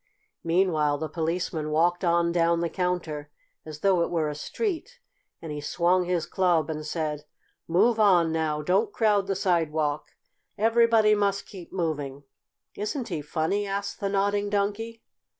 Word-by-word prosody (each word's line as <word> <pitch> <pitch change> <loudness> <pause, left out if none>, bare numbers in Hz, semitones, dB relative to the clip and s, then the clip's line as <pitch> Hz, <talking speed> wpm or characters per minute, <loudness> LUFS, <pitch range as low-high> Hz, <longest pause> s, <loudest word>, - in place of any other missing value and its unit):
Meanwhile 165 -4 +2
the 155 - -3
Policeman 165 -1 -2
walked 175 +4 +2
on 170 -1 +2
down 170 0 +2
the 170 - -1
counter, 170 -5 -2 0.4
as 155 -1 -8
though 190 -3 +3
it - - 0
were 160 -3 0
a - - -3
street, 420 - -4 0.4
and 160 - -6
he 150 0 -5
swung 175 +4 +1
his 175 -2 0
club 170 -5 +1
and 155 0 -5
said: 150 -1 -3 0.4
"Move 220 +7 +3
on 180 -6 +4
now! 155 -2 -1
Don't 195 +6 +1
crowd 205 -3 +2
the 195 - 0
sidewalk! 160 -5 0 0.4
Everybody 225 0 +4
must 200 -1 0
keep 185 -4 -11
moving!" 145 -6 -3 0.5
"Isn't 225 +5 -4
he 165 -5 -3
funny?" 160 +7 -1
asked 200 0 -3
the 200 - -1
Nodding 205 +1 0
Donkey. 210 +3 -2
175 Hz, 150 wpm, -26 LUFS, 155-200 Hz, 0.5 s, on